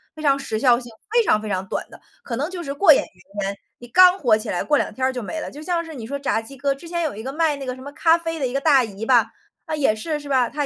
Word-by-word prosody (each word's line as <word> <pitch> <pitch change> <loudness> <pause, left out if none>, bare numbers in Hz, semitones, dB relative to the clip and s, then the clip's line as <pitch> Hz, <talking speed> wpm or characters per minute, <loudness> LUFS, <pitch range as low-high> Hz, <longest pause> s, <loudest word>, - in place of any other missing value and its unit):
非 310 - -9
常 280 -2 +4
时 270 -5 -3
效 240 -1 +4
性， 240 -2 -11 0.2
非 475 0 +4
常 215 - +2
非 215 - -6
常 190 -1 -2
短 - - -4
的， - - -14 0.2
可 235 - -4
能 290 +6 -2
就 365 -2 -6
是 280 - -4
过 315 +4 +6
眼 - - +2
云 195 +3 -9
烟。 200 +1 -3 0.2
你 240 - -11
刚 365 +8 +6
火 235 -8 +4
起 220 0 -6
来， 175 - -1
过 295 - +2
两 - - -1
天 260 - -1
儿 260 - +1
就 250 - -4
没 320 +9 -4
了， - - -6
就 295 - -10
像 335 +1 -1
是 320 - -9
你 235 -4 -7
说 280 +3 -3
炸 225 -5 0
鸡 275 +5 -12
哥， 280 +1 0
之 300 +5 -12
前 340 0 -1
有 305 -9 -2
一 220 - -7
个 265 - -4
卖 315 -1 +1
那 275 - -7
个 255 -1 -4
什 260 - -13
么 285 +2 -8
咖 325 +2 +4
啡 330 -1 -4
的 265 - 0
一 245 - -6
个 275 - +1
大 275 -4 +5
姨 215 -1 -6
吧， 240 -2 +4 0.3
她 315 -2 -3
也 270 -8 +2
是， 300 +8 -3
是 290 - -11
吧？ 255 -4 +2
她 295 0 -2
275 Hz, 355 characters per minute, -22 LUFS, 235-310 Hz, 0.3 s, 过